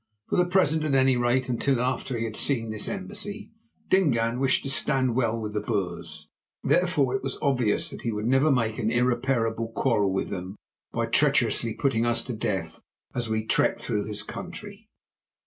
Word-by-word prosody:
For - - 0
the 180 - +4
present, 160 -4 +2
at 150 -3 +1
any 130 -1 +4
rate 120 +1 +1
until 125 +1 +1
after 130 0 -1
he 115 - -2
had 110 -2 -4
seen 115 -5 -1
this 110 -1 -2
embassy, 205 +2 -5 0.4
Dingaan 125 -10 +2
wished 135 -1 +2
to 135 - -2
stand 130 -3 +2
well 115 -2 +1
with 105 -1 -5
the 105 - -1
Boers. 85 -7 -3 0.4
Therefore 175 -8 +2
it 130 - -1
was 135 -1 -4
obvious 125 -7 +1
that - - -8
he 115 - -2
would 105 0 -3
never 135 +5 +4
make 115 -3 0
an 110 -2 0
irreparable 120 -1 +1
quarrel 105 -7 +2
with 95 - -2
them 95 0 -5 0.4
by - - -1
treacherously 115 -2 +2
putting 120 -2 +1
us 120 0 +1
to 125 - -5
death 95 -7 -3 0.3
as 120 -2 -2
we 110 0 -1
trekked - - +2
through 105 - -1
his 105 -1 -4
country. 205 +3 -9
120 Hz, 180 wpm, -26 LUFS, 110-135 Hz, 0.4 s, the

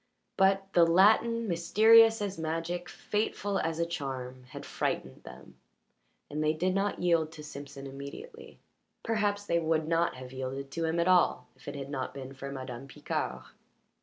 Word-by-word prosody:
But 195 0 +2
the 175 - +6
Latin, 220 +7 +4
mysterious 220 +5 +5
as 200 -3 -4
magic, 165 +2 -3
fateful 205 -1 -2
as 165 0 -2
a 170 - +1
charm, 130 -5 -5
had 125 - -9
frightened 65 - -3
them, - - -13 0.7
and 150 +1 -3
they 155 0 +2
did 180 +4 0
not 195 -1 -1
yield 165 -3 +2
to 150 - -10
Simpson 140 -2 -9
immediately. 140 - -9 0.5
Perhaps 205 -2 0
they 170 -3 +1
would 160 -1 0
not 165 +1 +1
have 130 0 -10
yielded 135 +1 -5
to 165 +2 -2
him 160 +1 0
at 170 - +2
all 185 -1 +3
if - - -20
it 145 - -5
had 140 0 -6
not 135 -1 -4
been 135 -1 -7
for 140 0 -7
Madame 130 -1 -7
Picard. - - -4
165 Hz, 165 wpm, -30 LUFS, 140-195 Hz, 0.7 s, the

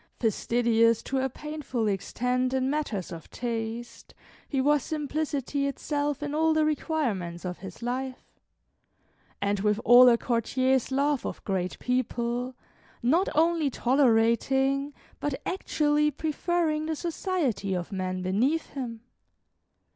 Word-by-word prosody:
Fastidious 230 0 +2
to 270 - -1
a 265 0 0
painful 280 -5 -3
extent 250 +6 0
in 260 +1 +1
matters 260 - -2
of 165 -2 -9
taste, 230 0 -5 0.3
he 275 - 0
was 290 +2 +3
simplicity 290 -2 -2
itself 290 +1 -2
in 290 0 -3
all 320 +1 +2
the 310 0 +3
requirements 230 - -1
of 180 0 -4
his 190 +3 -9
life; 255 +2 -3 1.2
and 200 0 +1
with 210 +1 +1
all 245 +1 +9
a 235 - +5
courtier's 255 +2 +1
love 280 0 +1
of - - -5
great 185 -3 -2
people, 250 0 -1 0.5
not 325 +10 +3
only 325 -1 +3
tolerating, 265 +2 +2 0.3
but 285 -2 -2
actually 300 -5 +1
preferring 310 +1 -1
the 320 - -1
society 310 - -1
of 175 +1 -4
men 185 -1 -3
beneath 245 - 0
him. 240 -5 -5
260 Hz, 125 wpm, -27 LUFS, 230-295 Hz, 1.2 s, all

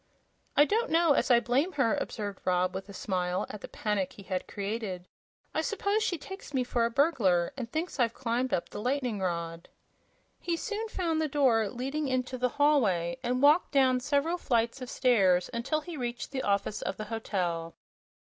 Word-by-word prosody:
"I 290 - +8
don't 455 +8 0
know 330 -2 +4
as - - +1
I 240 -1 +7
blame 270 +10 +1
her," 260 -6 +2
observed 205 -3 -4
Rob, 180 0 +1
with 190 +2 -6
a - - -7
smile 180 -2 -1
at 210 - -8
the - - -7
panic 210 -3 -2
he 200 - -12
had 185 -1 -3
created. 200 -3 -4 0.5
"I - - +1
s'pose 420 -2 0
she 385 -5 0
takes 355 -2 -9
me 255 - +2
for 240 -1 +1
a - - +1
burglar, 235 - +2
and 245 -3 -6
thinks 315 -1 -3
I've 235 -2 +2
climbed 245 0 -1
up 170 - -1
the - - -6
lightning 250 -3 -1
rod." 170 -2 -3 0.7
He 340 -1 -1
soon 440 +3 -3
found 330 -6 -1
the 310 - +1
door 255 -7 +3
leading 275 +6 -3
into 255 -1 -1
the 250 0 +2
hallway 225 - +2
and 250 +1 -1
walked 300 +4 +5
down 260 -2 +4
several 290 +6 0
flights 235 -1 0
of 250 - -6
stairs 195 -10 +3
until 265 +7 -1
he 335 +2 -7
reached 240 -1 -4
the 265 -1 -2
office 200 0 0
of - - -3
the 215 - -5
hotel. 180 -7 -3
245 Hz, 190 wpm, -29 LUFS, 200-290 Hz, 0.7 s, I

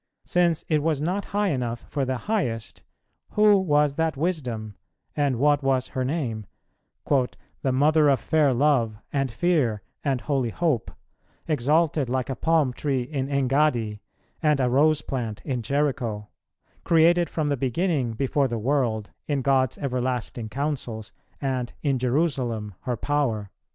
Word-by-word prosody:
Since 175 -3 +1
it 155 -2 +2
was 155 -2 0
not 180 +7 -1
high 205 0 0
enough 120 -5 -2
for 140 -2 -1
the 130 0 -1
Highest, 115 - -2 0.5
who 210 -1 +6
was 150 -5 +2
that 160 -3 0
Wisdom, 125 - -2 0.4
and 140 -3 +1
what 145 +3 +3
was 135 -2 +1
her 130 - -2
name, 125 - -2 0.6
"the 135 0 -1
Mother 150 +3 +4
of 135 - +3
fair 155 -3 +2
love, 125 -5 +2 0.2
and 135 -2 +1
fear, 125 - +1 0.2
and 135 -4 0
holy 135 -5 0
hope," 150 -3 0 0.6
"exalted 150 -1 +2
like 130 +1 -1
a - - -2
palm 155 -2 +2
tree 135 -2 -1
in 135 0 -3
Engaddi, 135 -5 +1 0.4
and 150 -3 +3
a 125 -2 +2
rose 150 +3 +3
plant 115 -6 -4
in 130 -4 -2
Jericho," 120 -5 -1 0.5
"created 170 +1 +4
from 155 -2 -1
the 145 - +2
beginning 135 -1 0
before 135 +4 +1
the 120 -2 -3
world" 115 -3 0 0.2
in 140 -3 0
God's 130 -2 +2
everlasting 125 -4 -2
counsels, 125 -4 -3 0.3
and 130 -3 -2
"in 135 -4 +1
Jerusalem 125 - 0
her 125 -2 -1
power"? 115 -8 -1
135 Hz, 145 wpm, -25 LUFS, 120-150 Hz, 0.6 s, who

